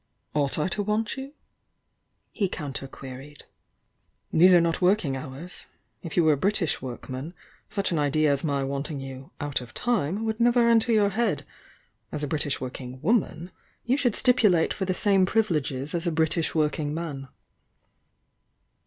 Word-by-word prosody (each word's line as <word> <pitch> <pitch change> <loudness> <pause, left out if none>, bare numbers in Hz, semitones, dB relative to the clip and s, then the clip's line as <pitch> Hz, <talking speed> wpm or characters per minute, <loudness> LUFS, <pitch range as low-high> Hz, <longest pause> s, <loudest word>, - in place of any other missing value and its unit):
"Ought 145 -2 +1
I 150 - +1
to 205 - -1
want 210 +1 -1
you?" 270 +1 -7 1.0
he 200 -4 -1
counter 135 -4 -5
queried. 135 +2 -10 0.9
"These 180 +4 +7
are 180 - +7
not 170 +1 0
working 180 -7 +2
hours! 140 +6 -8 0.3
If 165 - -7
you 175 - +5
were 155 -1 +5
a - - -1
Brit 200 +9 +1
ish 170 -6 -1
workman 130 +5 -6 0.3
such 195 -2 -1
an 165 - +1
idea 150 +1 +2
as 140 -1 +2
my 140 -3 0
wanting 140 +2 -3
you 135 0 -8
'out 145 -2 -2
of 120 -2 -12
time' 215 -3 0
would 220 0 -2
never 240 0 +4
enter 230 0 +4
your 210 -2 +4
head! 230 +4 -1 0.7
As 150 -1 -2
a - - -1
British 145 -2 -1
working 130 0 -7
woman, 185 -3 0 0.3
you 250 +2 +2
should 255 -6 +1
stipulate 210 -9 +4
for 190 - -3
the 185 -1 -1
same 195 -1 +4
privileges 150 - 0
as 170 0 -1
a - - +2
British 160 0 0
working 150 -1 0
man." 145 -5 -5
160 Hz, 165 wpm, -26 LUFS, 140-205 Hz, 1.0 s, These